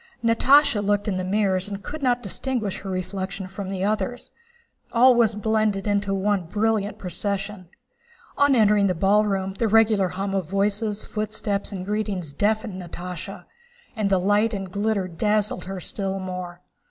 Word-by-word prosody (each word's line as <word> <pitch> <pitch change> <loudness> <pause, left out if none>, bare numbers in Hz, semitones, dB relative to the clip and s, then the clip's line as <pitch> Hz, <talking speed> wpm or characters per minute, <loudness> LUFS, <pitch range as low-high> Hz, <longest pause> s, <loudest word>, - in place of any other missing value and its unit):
Natásha 230 0 +4
looked 205 +1 +1
in 195 -3 0
the 185 - -2
mirrors 190 -1 +1
and 200 0 -6
could 310 0 -6
not 245 -2 +1
distinguish 220 0 -2
her 195 - -7
reflection 190 +1 -4
from 190 0 -6
the 190 -1 -3
others. 215 +4 -2 0.6
All 250 +2 +7
was 230 -3 +3
blended 215 -2 0
into 205 -1 0
one 195 -1 0
brilliant 215 +1 0
procession. 195 0 -3 0.7
On 285 -1 +4
entering 210 -3 +4
the 185 - 0
ballroom 195 0 +2
the 230 - +2
regular 215 -3 +4
hum 195 +2 -3
of 190 -5 -2
voices, 205 +2 0
footsteps, 215 -1 -2
and 185 -2 -5
greetings 200 -7 -3
deafened 210 0 -1
Natásha, 180 0 -7 0.5
and 215 -3 0
the 190 -1 +3
light 205 +4 +2
and 195 -2 -5
glitter 205 -1 0
dazzled 210 +2 0
her 190 0 -5
still 195 +2 -3
more. 180 -2 -6
200 Hz, 155 wpm, -24 LUFS, 190-215 Hz, 0.7 s, All